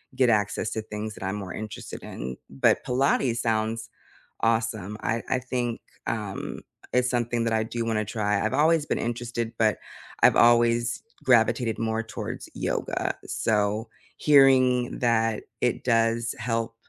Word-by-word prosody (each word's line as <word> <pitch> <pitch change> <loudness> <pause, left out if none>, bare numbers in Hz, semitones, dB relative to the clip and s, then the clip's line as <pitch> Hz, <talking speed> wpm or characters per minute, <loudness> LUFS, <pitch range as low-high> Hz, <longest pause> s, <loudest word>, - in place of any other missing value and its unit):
get 130 -1 +4
access 105 0 +1
to 110 - -2
things 110 0 -6
that - - -9
I'm 95 +2 -2
more 95 -3 -6
interested 110 -1 -7
in. 65 +1 -6
But 70 0 +2
Pilates 125 -1 +1
sounds 110 0 -1 0.5
awesome. 110 -3 0
I 115 +1 0
I 130 - +2
think, 125 -2 -2 0.3
um, 105 -4 -4 0.3
it's 125 0 +3
something 120 -1 0
that 115 - 0
I 110 0 +2
do 115 +1 -3
wanna 110 -2 0
try. 105 -2 0
I've - - -1
always 155 +2 +3
been - - -1
interested, 120 -1 -3
but 110 -2 +2 0.5
I've - - +7
always 120 0 +4 0.2
gravitated 115 -2 +3
more 115 0 -1
towards 115 - -6
yoga. - - -2
So, 105 +1 0 0.3
hearing 130 -4 +4
that 115 -2 +1 0.2
it 125 - 0
does 115 0 +1
help, 115 -1 -2
115 Hz, 145 wpm, -26 LUFS, 110-120 Hz, 0.5 s, I've